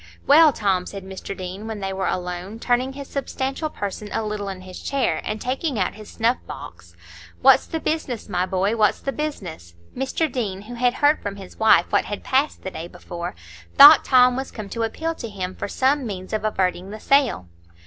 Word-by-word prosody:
"Well, 310 +2 +7
Tom," 195 -7 0
said 195 -1 -7
Mr 190 +1 -7
Deane, 185 +4 -6
when 220 -2 -5
they 195 -1 -3
were 190 0 -2
alone, 180 +3 -4
turning 250 +3 0
his 280 0 -8
substantial 275 +2 -3
person 205 -3 -5
a 220 - -2
little 210 -1 -3
in 190 -1 -7
his 185 0 -10
chair, 275 -2 0
and 215 0 -3
taking 265 +2 -2
out 185 -3 0
his 215 0 -12
snuff 235 +2 +1
box; 85 0 -10 0.5
"what's - - +6
the 325 - -3
business, 305 -8 -3
my 180 +1 -1
boy; 195 +4 0
what's 215 -3 +2
the 275 - -3
business?" 180 - -6 0.2
Mr 270 +5 -1
Deane, 200 -6 -3
who 235 +3 -9
had 245 0 +1
heard 290 +1 +3
from 200 -1 -4
his 195 -2 -12
wife 220 0 +5
what 205 - +2
had 205 - -5
passed 275 +3 0
the 190 - -5
day 165 0 -6
before, 175 - -7 0.4
thought 290 +1 +10
Tom 250 -1 +5
was 265 +1 -4
come 215 -3 -8
to 230 - -4
appeal 320 +9 -2
to 235 -8 -7
him 185 -3 -5
for - - -5
some 265 +4 +1
means 185 -2 -6
of 215 -1 -1
averting 190 -3 -1
the 215 +1 -8
sale. 270 - +2
215 Hz, 205 wpm, -23 LUFS, 190-265 Hz, 0.5 s, thought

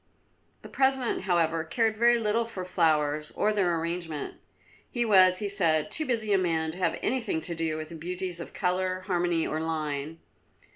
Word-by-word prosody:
The - - -8
President, 265 -7 0
however, 165 -3 +1
cared 220 +7 0
very 235 +2 +4
little 225 +1 +1
for 200 -5 -6
flowers 155 -4 +1
or 215 - +1
their 175 -5 +1
arrangement; 165 -2 -4 0.5
he 240 -1 -1
was, 185 -4 +6
he 205 - -1
said, 175 -3 +1
too 310 +5 +1
busy 220 -4 0
a 195 - +4
man 160 -3 0
to 175 - -10
have 180 -3 0
anything 225 -8 0
to 170 - -3
do 165 -1 -2
with 155 0 -6
the 170 - -8
beauties 180 +2 -4
of 170 - -7
colour, 185 0 -1
harmony, 175 -3 0
or 155 - -2
line. 155 -1 -3
180 Hz, 180 wpm, -28 LUFS, 160-210 Hz, 0.5 s, was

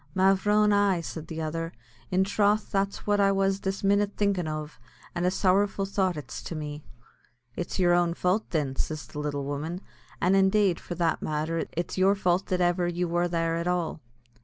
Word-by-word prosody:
"Mavrone, 205 +2 +4
ay," 200 -3 +3
said 160 -1 -7
the 160 0 -4
other; 165 +1 -3 0.4
"in 185 +1 +2
throth 205 +1 +1
that's 195 0 -1
what 205 0 +2
I 195 0 +4
was 195 0 +1
this 195 0 -3
minnit 200 +1 +2
thinkin' 200 -5 +1
ov, 155 0 -5 0.3
and 175 +1 0
a - - +5
sorrowful 195 +1 +2
thought 190 -3 0
it's 130 -5 -7
to 170 - -6
me." 150 -1 -6 0.7
"It's 175 - -4
yer 175 -2 +4
own 175 -1 +2
fau't, 185 +5 0
thin," 145 -5 -1
says 155 -1 -3
the 150 - -8
little 145 -1 -2
woman; 150 +5 -3 0.4
"an', 180 +2 +2
indeed, 195 -1 +3
for 175 - -6
that 170 -2 0
matter, 155 +2 -1
it's 175 +2 -3
yer 195 +2 +4
fau't 180 -1 +1
that 185 -1 0
ever 175 0 +2
you 175 +1 -1
wor 175 +1 +1
there 165 -1 0
at 170 +1 -2
all." 175 -3 -1
180 Hz, 190 wpm, -27 LUFS, 165-195 Hz, 0.7 s, a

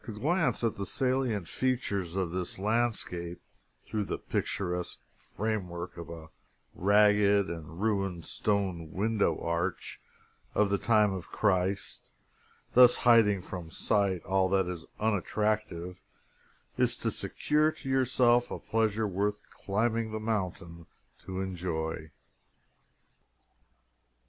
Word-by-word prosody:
To 115 - -5
glance 135 - 0
at 115 - 0
the 100 - -3
salient 125 -8 0
features 100 -9 -1
of 95 -3 -1
this 90 0 -3
landscape 100 -5 -1 0.5
through 105 -2 -2
the - - -3
picturesque 90 -2 -3
framework 90 -5 -4
of 85 -2 -8
a 80 -1 -9 0.4
ragged 100 0 +4
and 80 0 -8
ruined 95 -5 -1
stone 95 -6 -1
window 105 -4 +1
arch 85 0 -3 0.5
of 105 -1 +3
the 100 - +2
time 105 -3 +3
of 95 -3 -6
Christ, 95 -1 -1 0.6
thus 125 -1 +8
hiding 105 -6 +5
from 90 -3 -7
sight 95 0 +1
all 95 -1 +2
that 95 0 +2
is 90 -2 -6
unattractive, 105 -3 -1 0.8
is - - +2
to - - -1
secure 150 +1 +1
to 135 - -11
yourself 125 -2 +3
a - - -4
pleasure 110 -1 0
worth 105 +2 -1
climbing 110 +3 -1
the 110 - -3
mountain 90 -6 -3 0.4
to 95 0 -4
enjoy. 80 -4 -3
100 Hz, 115 wpm, -30 LUFS, 90-110 Hz, 0.8 s, thus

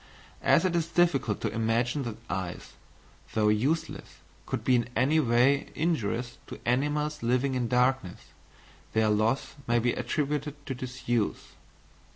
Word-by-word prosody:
As - - +4
it 175 -2 +1
is 165 -1 +1
difficult 160 - +1
to - - -2
imagine 115 +5 0
that 115 -2 -5
eyes, 95 -1 -5 0.6
though 105 -1 +3
useless, 130 +10 -1 0.3
could - - -3
be 130 - +4
in 120 0 0
any 140 +7 +3
way 130 +1 +3
injurious 125 -6 -1
to - - -8
animals 150 +4 0
living 125 +3 +1
in 125 -2 0
darkness, 125 -6 +1 0.7
their 110 -1 +3
loss 110 +7 +1
may 120 0 +3
be 120 +1 +2
attributed 145 +3 -2
to 135 - -3
disuse. 120 -3 -2
125 Hz, 140 wpm, -28 LUFS, 115-145 Hz, 0.7 s, As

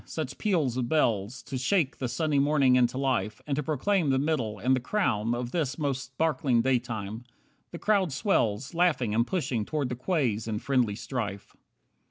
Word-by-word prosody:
Such - - -5
peals 160 - +1
of 120 -2 -1
bells, 115 -7 0
To 130 - -5
shake 155 +1 +1
the 130 - -1
sunny 150 +2 0
morning 140 -2 +4
into 125 0 +2
life, 130 -7 -1
And 140 - -1
to 150 - 0
proclaim 160 +3 0
the 135 - +3
middle, 130 -7 -1
and 125 +6 +2
the - - 0
crown, 120 - 0
Of 120 0 -4
this 150 -6 -1
most 140 -4 -1
sparkling 130 -3 +1
daytime! 115 -4 -1 0.5
The 170 - -7
crowd 195 -3 +1
swells, 130 - 0
Laughing 165 -10 +2
and 115 +2 +2
pushing 135 - -1
toward 145 +2 -2
the 125 - -3
quays 125 - -1
in 110 -1 -2
friendly 125 -4 +1
strife. 105 -4 -5
130 Hz, 180 wpm, -28 LUFS, 115-155 Hz, 0.5 s, morning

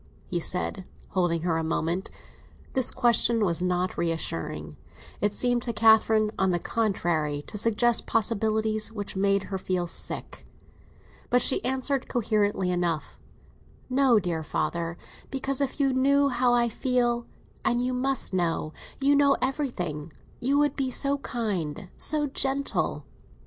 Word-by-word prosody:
he 175 - 0
said, 180 +3 -1 0.3
holding 175 -3 0
her 165 -2 +1
a - - -2
moment. 165 +3 -1 0.6
This 260 -2 +2
question 235 -3 +3
was 170 -2 +1
not 180 0 -1
reassuring; 80 - -3 0.5
it 205 - +2
seemed 245 +3 0
to 235 -1 -3
Catherine, 220 -1 +4
on 190 - +3
the 175 - +2
contrary, 170 -8 -1
to - - -10
suggest 230 +2 +2
possibilities 220 0 0
which 205 -3 -5
made 200 0 +2
her 190 -1 -4
feel 185 -1 -1
sick. 170 - -4 0.8
But 245 - +4
she - - +3
answered 265 +1 -1
coherently 205 -5 0
enough—"No, 210 - -1
dear 175 -4 -2
father; 170 +2 -2 0.3
because 270 0 -2
if 275 +2 -2
you 275 -2 +2
knew 280 +2 +3
how 250 -1 +2
I 240 0 +3
feel—and 240 0 -1
you 250 +1 -1
must 260 -3 -1
know, 165 -3 -1 0.3
you 280 +1 +3
know 285 -1 +4
everything—you 245 - -3
would 290 -1 +2
be 270 -2 -1
so 280 +2 0
kind, 205 - -3
so 300 -1 +3
gentle." 275 0 -1
220 Hz, 135 wpm, -26 LUFS, 180-255 Hz, 0.8 s, Catherine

